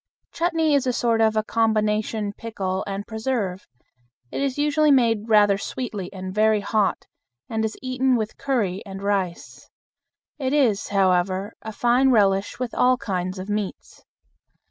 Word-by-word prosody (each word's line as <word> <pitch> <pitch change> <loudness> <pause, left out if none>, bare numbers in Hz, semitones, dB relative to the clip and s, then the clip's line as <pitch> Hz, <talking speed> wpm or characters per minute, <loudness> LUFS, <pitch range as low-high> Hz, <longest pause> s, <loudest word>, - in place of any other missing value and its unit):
Chutney 330 -2 +1
is 275 -2 +2
a 250 - +1
sort 230 -1 +1
of 220 -1 +3
a 215 - +1
combination 215 -1 0
pickle 195 -4 -4
and 200 +1 -4
preserve. 220 -5 -3 0.6
It - - -3
is 275 -1 -1
usually 295 +1 +2
made 230 -5 +3
rather 205 -2 +5
sweetly 210 -6 -5
and 185 -1 -7
very 215 0 +3
hot, 205 0 0 0.4
and 220 0 -2
is 220 0 -3
eaten 255 0 +1
with 220 -2 -2
curry 210 -9 -1
and 195 -1 -8
rice. 195 -4 -3 0.7
It 265 -1 -1
is, 245 -9 +2
however, 190 +1 +1
a 220 - -6
fine 245 +4 +3
relish 200 -4 +2
with 250 -2 -4
all 255 0 +3
kinds 185 -3 -3
of 185 +1 -6
meats. 210 -2 -5
215 Hz, 150 wpm, -23 LUFS, 195-250 Hz, 0.7 s, rather